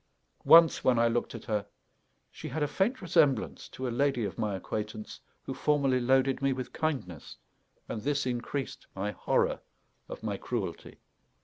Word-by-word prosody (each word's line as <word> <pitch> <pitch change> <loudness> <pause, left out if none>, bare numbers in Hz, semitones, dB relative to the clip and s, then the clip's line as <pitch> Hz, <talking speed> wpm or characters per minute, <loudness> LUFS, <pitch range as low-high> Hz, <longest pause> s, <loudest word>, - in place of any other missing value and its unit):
Once, 165 -1 +7
when 125 -2 +4
I 115 0 +4
looked 120 +1 -1
at - - -9
her, 105 -3 -1 0.7
she - - -8
had 155 - -2
a - - +1
faint 195 - 0
resemblance 155 - +2
to 130 - -5
a - - -2
lady 135 -3 +1
of 100 - -5
my 105 -3 -1
acquaintance 105 +3 -5 0.2
who - - -5
formerly 140 -4 +2
loaded 130 +2 +2
me 135 -1 +2
with 130 -1 -6
kindness; 130 - -3 0.5
and 110 - -4
this 140 +1 0
increased 125 +2 -4
my 100 +2 -2
horror - - 0 0.5
of - - -8
my 105 -2 -2
cruelty. 100 -8 -5
130 Hz, 165 wpm, -29 LUFS, 110-145 Hz, 0.7 s, Once